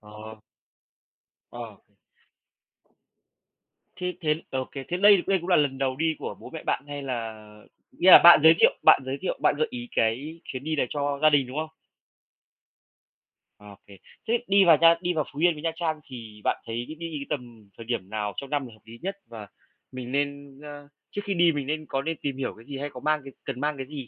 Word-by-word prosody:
Ờ. 110 Hz, +1 st, -12 dB, 1.1 s
Ờ. 115 Hz, -3 st, -9 dB, 2.2 s
Thế 180 Hz, 0 st, -3 dB
thế, 155 Hz, 0 st, 0 dB
ờ, 130 Hz, -, -2 dB
ô 130 Hz, -, -3 dB
kê. 135 Hz, -1 st, -7 dB
Thế 175 Hz, -, -1 dB
đây 200 Hz, -2 st, +6 dB
đây 195 Hz, -, +3 dB
cũng 175 Hz, +3 st, -7 dB
là 180 Hz, -, +5 dB
lần 140 Hz, -3 st, +1 dB
đầu 130 Hz, -1 st, -1 dB
đi 160 Hz, +2 st, 0 dB
của -, -, -6 dB
bố -, -, -11 dB
mẹ 160 Hz, -, -7 dB
bạn 135 Hz, -, -1 dB
hay 145 Hz, 0 st, -6 dB
là 120 Hz, -5 st, -4 dB, 0.6 s
nghĩa 185 Hz, -, +4 dB
là -, -, +12 dB
bạn 175 Hz, -1 st, +10 dB
giới 160 Hz, +1 st, +9 dB
thiệu -, -, +6 dB
bạn -, -, +7 dB
giới 135 Hz, +1 st, -3 dB
thiệu, 190 Hz, -, -3 dB
bạn -, -, +3 dB
gợi 155 Hz, -, +1 dB
ý 120 Hz, -1 st, -7 dB
cái 140 Hz, +9 st, -1 dB
chuyến 130 Hz, +1 st, -7 dB
đi 155 Hz, 0 st, -2 dB
này 135 Hz, -, 0 dB
cho 145 Hz, -1 st, -2 dB
gia 155 Hz, -, +6 dB
đình, 140 Hz, -4 st, +2 dB
đúng 130 Hz, -, -7 dB
không? 155 Hz, 0 st, -3 dB, 1.9 s
Ô 105 Hz, -1 st, -13 dB
kê. 100 Hz, -1 st, -14 dB, 0.3 s
Thế 230 Hz, -, +1 dB
đi 195 Hz, 0 st, +5 dB
vào 165 Hz, -3 st, +7 dB
nha 165 Hz, 0 st, +7 dB
đi 180 Hz, -1 st, -1 dB
vào 155 Hz, -3 st, -1 dB
Phú 145 Hz, -, -8 dB
Yên 175 Hz, 0 st, +4 dB
với 150 Hz, +1 st, -11 dB
Nha 165 Hz, -, 0 dB
Trang 160 Hz, -2 st, -2 dB
thì 110 Hz, -4 st, -11 dB
bạn -, -, +1 dB
thấy 115 Hz, +1 st, -4 dB
đi 155 Hz, -, -9 dB, 0.2 s
cái 140 Hz, -, -6 dB
tầm 120 Hz, -8 st, -7 dB
thời 115 Hz, -, -10 dB
điểm 110 Hz, -5 st, -3 dB
nào 105 Hz, -2 st, -3 dB
trong 140 Hz, -, -6 dB
năm 145 Hz, -1 st, -1 dB
là 115 Hz, -, -14 dB
hợp 110 Hz, -, -19 dB
lý 115 Hz, +1 st, -12 dB
nhất, 195 Hz, +2 st, -4 dB
và 110 Hz, -3 st, -9 dB, 0.4 s
mình 125 Hz, -1 st, -7 dB
nên, 140 Hz, -1 st, -3 dB
ơ 145 Hz, -1 st, -10 dB, 0.2 s
trước 205 Hz, -, -4 dB
khi 200 Hz, -, -1 dB
đi 170 Hz, -1 st, +4 dB
mình 145 Hz, -3 st, -4 dB
nên 155 Hz, +1 st, -3 dB
có 135 Hz, -, -2 dB
nên 160 Hz, +2 st, -3 dB
tìm 140 Hz, -2 st, -3 dB
hiểu 135 Hz, -2 st, -3 dB
cái 115 Hz, -, -16 dB
gì, 140 Hz, -1 st, -7 dB
hay 145 Hz, +1 st, -4 dB
có 125 Hz, -, -8 dB
mang 155 Hz, +2 st, 0 dB
cái 135 Hz, -1 st, -11 dB
cần 135 Hz, -2 st, -5 dB
mang 150 Hz, 0 st, -1 dB
cái 135 Hz, -, -5 dB
gì 140 Hz, -3 st, -8 dB
140 Hz, 230 wpm, -26 LUFS, 120-160 Hz, 2.2 s, là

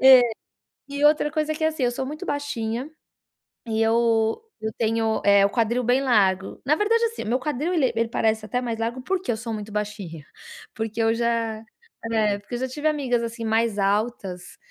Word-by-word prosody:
É, 265 Hz, -1 st, +9 dB, 0.7 s
e 285 Hz, +1 st, -2 dB
outra 300 Hz, 0 st, +4 dB
coisa, 310 Hz, -1 st, 0 dB
que 315 Hz, -, -6 dB
é -, -, +5 dB
assim, 310 Hz, -5 st, -2 dB
eu 245 Hz, -, +1 dB
sou 265 Hz, -, -3 dB
muito 305 Hz, +6 st, -6 dB
baixinha, 270 Hz, -2 st, -3 dB, 0.8 s
e 220 Hz, -1 st, 0 dB
eu 225 Hz, -1 st, +2 dB, 0.2 s
eu 220 Hz, 0 st, -2 dB
tenho, 225 Hz, -1 st, +1 dB
eh, 200 Hz, -1 st, +6 dB
o -, -, -3 dB
quadril 235 Hz, +2 st, +1 dB
bem 245 Hz, +3 st, +3 dB
largo, 195 Hz, -7 st, +2 dB
na 300 Hz, +2 st, +4 dB
verdade, 455 Hz, +3 st, +2 dB
assim, 460 Hz, -, -5 dB
meu 240 Hz, +4 st, +1 dB
quadril 300 Hz, +5 st, -1 dB
ele 265 Hz, -8 st, +2 dB
ele 230 Hz, 0 st, +1 dB
parece 220 Hz, -1 st, 0 dB
até 245 Hz, +3 st, -1 dB
mais 235 Hz, -2 st, -3 dB
largo 235 Hz, +3 st, -3 dB
porque 370 Hz, -4 st, -1 dB
eu -, -, -2 dB
sou 225 Hz, +1 st, -5 dB
muito 210 Hz, 0 st, -6 dB
baixinha, 205 Hz, -7 st, -5 dB, 0.5 s
porque 225 Hz, 0 st, -2 dB
eu 225 Hz, 0 st, +3 dB
já 230 Hz, -2 st, 0 dB, 0.5 s
né, 215 Hz, -3 st, +2 dB
porque 205 Hz, +4 st, -8 dB
eu -, -, -4 dB
já 260 Hz, -, -1 dB
tive 295 Hz, +4 st, -5 dB
amigas 265 Hz, -6 st, 0 dB
assim 230 Hz, 0 st, -5 dB
mais 225 Hz, -1 st, +1 dB
altas, 195 Hz, -3 st, -1 dB
230 Hz, 195 wpm, -24 LUFS, 220-265 Hz, 0.8 s, É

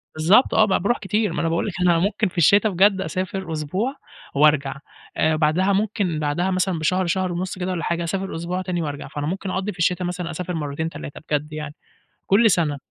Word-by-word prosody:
بالضبط، 180 Hz, +11 st, +4 dB
آه 220 Hz, -, +5 dB
ب -, -, -4 dB
باروح 225 Hz, +6 st, +1 dB
كتير 210 Hz, +2 st, -1 dB
ما -, -, -1 dB
أنا 165 Hz, -, 0 dB
باقول 165 Hz, +4 st, 0 dB
لِك 200 Hz, -, -4 dB
أنا 175 Hz, -2 st, +4 dB
ممكن 205 Hz, +4 st, +1 dB
في 180 Hz, -, -11 dB
الشتا 200 Hz, +6 st, +5 dB
بجد 195 Hz, +1 st, +3 dB
أسافر 185 Hz, -1 st, -3 dB
أسبوع 185 Hz, -, -2 dB, 0.4 s
وأرجع 140 Hz, -1 st, +3 dB, 0.4 s
آآ، 155 Hz, 0 st, +2 dB
بعدها 165 Hz, +6 st, +2 dB
ممكن 200 Hz, -5 st, 0 dB
بعدها 155 Hz, +5 st, 0 dB
مثلًا 185 Hz, -2 st, 0 dB
بشهر، 185 Hz, +4 st, +1 dB
شهر 185 Hz, +1 st, 0 dB
ونص 180 Hz, +2 st, -3 dB
كده 185 Hz, +1 st, -2 dB
والَّا 175 Hz, -3 st, -3 dB
حاجة، 170 Hz, +1 st, -1 dB
أسافر 190 Hz, +3 st, -3 dB
أسبوع 175 Hz, +3 st, -3 dB
تاني 180 Hz, -2 st, -2 dB
وأرجع، 145 Hz, -3 st, -5 dB
فأنا 145 Hz, +1 st, -4 dB
ممكن 190 Hz, +3 st, -3 dB
أقضّي 190 Hz, +2 st, -2 dB
في 180 Hz, -, -14 dB
الشتا 180 Hz, +2 st, +1 dB
مثلًا 180 Hz, -1 st, -4 dB
أسافر 180 Hz, +2 st, -4 dB
مرتين 155 Hz, 0 st, -3 dB
3 145 Hz, -, -9 dB
بجد 150 Hz, +1 st, -1 dB
يعني، 150 Hz, -1 st, -5 dB, 0.5 s
كل 220 Hz, +3 st, +5 dB
سنة، 155 Hz, -5 st, +1 dB
180 Hz, 210 wpm, -22 LUFS, 155-190 Hz, 0.5 s, آه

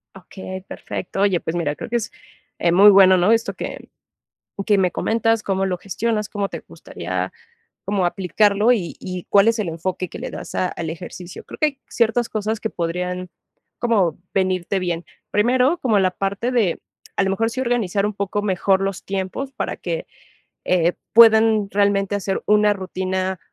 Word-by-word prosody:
Okey, 190 Hz, +1 st, -8 dB
perfecto. 195 Hz, -, -5 dB
Oye, 195 Hz, -3 st, +3 dB
pues 160 Hz, -, -4 dB
mira, 150 Hz, -4 st, -1 dB
creo -, -, -7 dB
que 240 Hz, -, -2 dB
es, 230 Hz, -, -4 dB, 0.5 s
eh, 170 Hz, -, +2 dB
muy 195 Hz, +4 st, +8 dB
bueno, 190 Hz, -2 st, +7 dB
¿no?, 180 Hz, +4 st, +3 dB
esto 230 Hz, 0 st, +2 dB
que -, -, -7 dB, 0.8 s
que 210 Hz, -, +4 dB
me 185 Hz, -2 st, +2 dB
comentas, 225 Hz, +3 st, 0 dB
cómo 195 Hz, -1 st, 0 dB
lo 180 Hz, -1 st, -2 dB
gestionas, 210 Hz, +3 st, -2 dB
cómo 200 Hz, -2 st, -2 dB
te -, -, -6 dB
gustaría, -, -, -5 dB, 0.5 s
como 195 Hz, -2 st, +1 dB
aplicarlo 200 Hz, +5 st, +2 dB
y 200 Hz, -9 st, +1 dB
y 180 Hz, -1 st, -6 dB
cuál 200 Hz, +2 st, +5 dB
es 230 Hz, 0 st, +2 dB
el 210 Hz, -5 st, -1 dB
enfoque, 175 Hz, +2 st, -3 dB
que -, -, -9 dB
le -, -, -5 dB
das -, -, -8 dB
a 185 Hz, -, +1 dB
al 165 Hz, -2 st, -5 dB
ejercicio. 175 Hz, +1 st, -8 dB
Creo -, -, -11 dB
que 305 Hz, -, +4 dB
hay 275 Hz, -2 st, -4 dB
ciertas 235 Hz, 0 st, +1 dB
cosas, 215 Hz, 0 st, -2 dB
que 220 Hz, -, -3 dB
podrían, 180 Hz, +1 st, -3 dB, 0.5 s
como 200 Hz, -9 st, +2 dB, 0.2 s
venirte 185 Hz, 0 st, 0 dB
bien. 175 Hz, -2 st, -2 dB, 0.3 s
Primero, 250 Hz, +9 st, +3 dB
como 225 Hz, -8 st, +2 dB
la 185 Hz, -1 st, +2 dB
parte 200 Hz, +6 st, -2 dB
de 215 Hz, -9 st, +1 dB, 0.4 s
a -, -, +3 dB
lo 195 Hz, -, 0 dB
mejor, 225 Hz, +4 st, 0 dB
sí 255 Hz, -, -4 dB
organizar 220 Hz, -6 st, 0 dB
un 210 Hz, -, -3 dB
poco 200 Hz, +1 st, -2 dB
mejor 190 Hz, -1 st, +2 dB
los 195 Hz, -1 st, -3 dB
tiempos, 195 Hz, +8 st, -3 dB
para -, -, -3 dB
que, -, -, -4 dB, 0.6 s
eh, 175 Hz, -1 st, +2 dB, 0.2 s
puedan 220 Hz, -2 st, +6 dB
realmente 200 Hz, -1 st, +1 dB
hacer 195 Hz, -1 st, -2 dB
una 210 Hz, 0 st, +4 dB
rutina, 185 Hz, -1 st, -3 dB
195 Hz, 180 wpm, -21 LUFS, 185-220 Hz, 0.8 s, muy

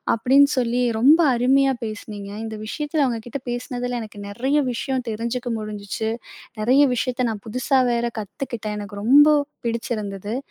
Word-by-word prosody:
அப்படீன்னு 270 Hz, +5 st, +5 dB
சொல்லி 245 Hz, 0 st, +1 dB, 0.2 s
ரொம்ப 295 Hz, +7 st, +6 dB, 0.2 s
அருமையா 270 Hz, +2 st, +3 dB
பேசுனீங்க. 205 Hz, -2 st, -7 dB
இந்த 220 Hz, -1 st, -5 dB
விஷயத்துல 295 Hz, +5 st, -1 dB
உங்க 230 Hz, -1 st, -2 dB
கிட்ட 270 Hz, +2 st, -5 dB
பேசினதுல 245 Hz, 0 st, -3 dB
எனக்கு 210 Hz, -2 st, -9 dB
நெறைய 265 Hz, +8 st, 0 dB
விஷயம் 255 Hz, +1 st, -2 dB
தெரிஞ்சுக்க 235 Hz, +3 st, -3 dB
முடிஞ்சுச்சு. 215 Hz, +1 st, -4 dB, 0.5 s
நெறைய 260 Hz, +6 st, +5 dB
விஷயத்த 255 Hz, 0 st, -1 dB
நான் 205 Hz, -2 st, -7 dB
புதுசா 255 Hz, +4 st, +1 dB
வேற 235 Hz, 0 st, 0 dB
கத்துக்கிட்டேன். 215 Hz, 0 st, -5 dB
எனக்கு 205 Hz, 0 st, -7 dB
ரொம்ப 290 Hz, +5 st, +7 dB, 0.3 s
பிடிச்சிருந்தது. 215 Hz, -2 st, -3 dB
240 Hz, 135 wpm, -22 LUFS, 215-265 Hz, 0.5 s, ரொம்ப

